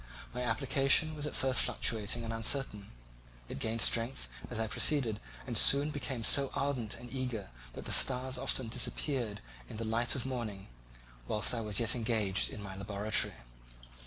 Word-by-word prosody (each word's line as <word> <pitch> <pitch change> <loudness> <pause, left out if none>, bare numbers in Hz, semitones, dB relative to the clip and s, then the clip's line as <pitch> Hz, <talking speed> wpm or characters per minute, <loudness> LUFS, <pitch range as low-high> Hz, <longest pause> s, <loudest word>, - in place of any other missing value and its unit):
My 125 - -4
application 135 +6 +2
was 150 -1 -3
at - - -6
first 130 -2 +3
fluctuating 110 +1 -1
and 115 0 -4
uncertain; 115 -3 -2 0.6
it - - -7
gained 110 +5 -1
strength 115 - +2 0.2
as - - -4
I 110 - +1
proceeded 115 -1 +2 0.3
and - - -5
soon 140 +2 +4
became 135 -5 -4
so 135 +4 +6
ardent 130 -6 -2
and 120 +1 -11
eager 125 - -4 0.2
that - - -9
the - - -4
stars 125 - +3
often 130 -1 0
disappeared 120 -1 -2 0.3
in - - -8
the 115 - -3
light 115 +2 +1
of 130 -2 -2
morning 115 - -5 0.6
whilst 105 +2 +2
I 115 - -2
was 105 -3 0
yet 115 -2 +1
engaged 110 -5 0
in 105 - -8
my 95 -1 -7
laboratory. 100 - -1
115 Hz, 165 wpm, -32 LUFS, 105-130 Hz, 0.6 s, so